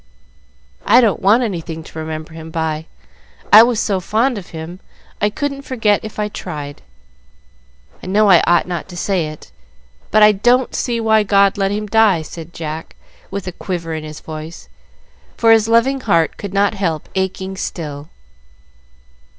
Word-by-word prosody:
"I 230 Hz, +5 st, +6 dB
don't 225 Hz, -6 st, +2 dB
want 220 Hz, +6 st, +4 dB
anything 165 Hz, -6 st, -4 dB
to 160 Hz, -, -10 dB
remember 155 Hz, 0 st, -6 dB
him 160 Hz, 0 st, -9 dB
by. 160 Hz, -1 st, -3 dB, 0.7 s
I 215 Hz, -, +12 dB
was 235 Hz, -1 st, +2 dB
so 195 Hz, -2 st, 0 dB
fond 225 Hz, +5 st, 0 dB
of 180 Hz, -, -12 dB
him, 165 Hz, +3 st, -8 dB, 0.4 s
I 210 Hz, -, +3 dB
couldn't 275 Hz, +4 st, -4 dB
forget 225 Hz, -7 st, +1 dB
if 215 Hz, -1 st, -9 dB
I 210 Hz, 0 st, -1 dB
tried. 145 Hz, -7 st, -7 dB, 1.2 s
I -, -, -9 dB
know 210 Hz, +3 st, +3 dB
I 180 Hz, -4 st, +7 dB
ought 175 Hz, -1 st, +4 dB
not 175 Hz, 0 st, -5 dB
to 175 Hz, -, -9 dB
say 180 Hz, -4 st, 0 dB
it, 155 Hz, 0 st, -11 dB, 0.6 s
but 215 Hz, -, +4 dB
I 210 Hz, -, +8 dB
don't 245 Hz, +5 st, +2 dB
see 235 Hz, -2 st, -1 dB
why 220 Hz, -1 st, +3 dB
God 200 Hz, -1 st, +3 dB
let 195 Hz, -1 st, 0 dB
him 210 Hz, +1 st, -2 dB
die," 210 Hz, -5 st, +3 dB
said 165 Hz, +1 st, -10 dB
Jack, 160 Hz, -1 st, -7 dB, 0.3 s
with 200 Hz, -1 st, -5 dB
a 185 Hz, -, -4 dB
quiver 170 Hz, -2 st, -5 dB
in 155 Hz, -1 st, -4 dB
his 155 Hz, 0 st, -9 dB
voice, 155 Hz, +1 st, -9 dB, 0.7 s
for 225 Hz, -1 st, +4 dB
his 225 Hz, -1 st, +5 dB
loving 235 Hz, +4 st, +3 dB
heart 170 Hz, -9 st, +1 dB
could 200 Hz, -, -7 dB
not 200 Hz, +1 st, +2 dB
help 170 Hz, -7 st, -2 dB
aching 190 Hz, 0 st, -3 dB
still. 150 Hz, -5 st, -6 dB
195 Hz, 165 wpm, -18 LUFS, 160-215 Hz, 1.2 s, I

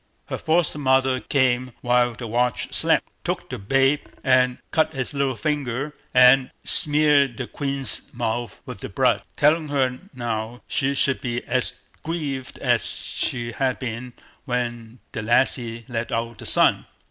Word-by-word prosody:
Her -, -, -3 dB
foster 160 Hz, -2 st, +1 dB
mother 130 Hz, -1 st, +2 dB
came 130 Hz, -2 st, 0 dB
while 120 Hz, -1 st, +2 dB
the 120 Hz, -, -7 dB
watch 120 Hz, +2 st, -1 dB
slept, -, -, +3 dB, 0.2 s
took -, -, -3 dB
the -, -, -5 dB
babe, 135 Hz, +7 st, +2 dB, 0.2 s
and 125 Hz, -1 st, +3 dB
cut 160 Hz, -3 st, +1 dB
its 130 Hz, +1 st, -1 dB
little 140 Hz, -2 st, 0 dB
finger, 140 Hz, +2 st, -2 dB, 0.2 s
and 125 Hz, +1 st, +6 dB
smeared 145 Hz, -4 st, +3 dB
the 130 Hz, -, -3 dB
queen's 135 Hz, +1 st, 0 dB
mouth 120 Hz, -2 st, -4 dB
with -, -, -8 dB
the -, -, -7 dB
blood, -, -, +2 dB
telling 155 Hz, +2 st, +3 dB
her 130 Hz, -3 st, 0 dB, 0.2 s
now 120 Hz, -1 st, -4 dB
she 140 Hz, 0 st, 0 dB
should 135 Hz, -1 st, +1 dB
be 120 Hz, -1 st, -3 dB
as 125 Hz, 0 st, -1 dB, 0.2 s
grieved 145 Hz, -6 st, -4 dB
as -, -, +1 dB
she 120 Hz, -2 st, -3 dB
had 130 Hz, +2 st, -1 dB
been 125 Hz, 0 st, -6 dB, 0.3 s
when 120 Hz, -2 st, -3 dB
the 110 Hz, -, -4 dB
lassie 115 Hz, 0 st, +1 dB
let 120 Hz, -2 st, -4 dB
out 115 Hz, -1 st, -3 dB
the -, -, -4 dB
sun. -, -, +4 dB
125 Hz, 150 wpm, -23 LUFS, 120-140 Hz, 0.3 s, and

